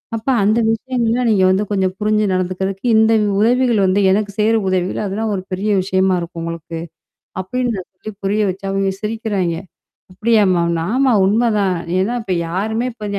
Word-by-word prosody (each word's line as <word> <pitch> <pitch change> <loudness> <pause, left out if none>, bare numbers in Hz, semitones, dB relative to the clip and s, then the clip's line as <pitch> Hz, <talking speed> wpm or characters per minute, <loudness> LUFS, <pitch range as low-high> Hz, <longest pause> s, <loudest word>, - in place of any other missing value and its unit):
அப்ப 225 +4 -4
அந்த 215 +3 +3
விஷயங்கள்லாம் 240 +1 0
நீங்க 195 -3 +3
வந்து 190 +3 +2
கொஞ்சம் 190 -2 0
புரிஞ்சு 215 0 +1
நடந்துக்கறக்கு, 185 +3 -2
இந்த 220 +1 +4 0.3
உதவிகள் 240 0 +3
வந்து 190 +2 +2
எனக்கு 205 +1 0
சேய்ற 220 +2 +3
உதவிகள். 185 0 -1
அதெல்லாம் 210 +2 -2
ஒரு 185 - -3
பெரிய 195 +3 -2
விஷயமா 190 0 +1
இருக்கும் 170 0 -7
உங்களுக்கு" 165 0 -6 0.6
அப்டின்னு 245 +5 -2
நான் 185 - -7
சொல்லி 195 +4 -9
புரிய 205 +2 +1
வச்சேன் 195 +1 -5
அவங்க 195 0 0
சிரிக்கிறாயங்க. 210 -6 -2 0.5
"அப்படியாமா" 200 -5 +2 0.3
ஆமா 265 0 +3
உண்மதான். 210 -3 +1 0.2
ஏன்னா 220 +6 0
இப்ப 185 -4 -1
யாருமே 220 +7 -2
இப்ப 215 - -8
205 Hz, 155 wpm, -18 LUFS, 185-225 Hz, 0.6 s, இந்த